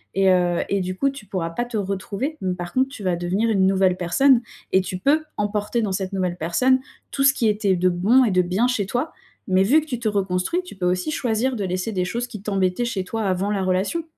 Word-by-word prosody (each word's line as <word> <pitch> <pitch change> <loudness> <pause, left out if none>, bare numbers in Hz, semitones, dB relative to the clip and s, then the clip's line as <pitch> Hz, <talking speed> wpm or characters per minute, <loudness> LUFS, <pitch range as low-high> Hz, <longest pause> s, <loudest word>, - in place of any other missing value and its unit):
et 195 0 +4
heu 175 -1 +2
et 200 - +1
du 185 0 -3
coup 275 - +2
tu 275 -6 -11
pourras 175 -4 -3
pas 240 +8 -2
te 240 -1 -8
retrouver, 200 +9 -3
mais 185 -1 -1
par 175 -1 -6
contre 260 +1 +2
tu 270 -7 -9
vas 180 -2 +1
devenir 185 +6 0
une 195 -3 +3
nouvelle 190 -1 +2
personne 240 +9 +3 0.3
et 190 - +4
tu 185 0 -5
peux 300 +7 +2
emporter 210 +3 -1
dans 210 -3 -1
cette 190 0 -3
nouvelle 180 -2 -1
personne 250 +12 +2 0.3
tout 275 - 0
ce 275 - +6
qui 235 -5 0
était 205 -2 +1
de 180 +1 +2
bon 205 +9 +4
et - - +1
de 185 -1 +4
bien 190 +7 +1
chez 235 -6 0
toi 245 +10 -2 0.4
mais 185 0 +3
vu 280 +11 +4
que 310 - -10
tu 250 -4 -3
te 235 - -2
reconstruis 195 - -1
tu 360 - -11
peux 185 -2 -3
aussi 180 +9 0
choisir 245 0 0
de 210 - -3
laisser 185 +4 -2
des 180 -2 0
choses 235 +6 -3
qui 210 -5 -9
t'embêtaient 195 +2 0
chez 205 -5 -2
toi 220 +4 -4
avant 190 +1 0
la 200 -2 -1
relation. 190 - 0
195 Hz, 250 wpm, -22 LUFS, 185-240 Hz, 0.4 s, ce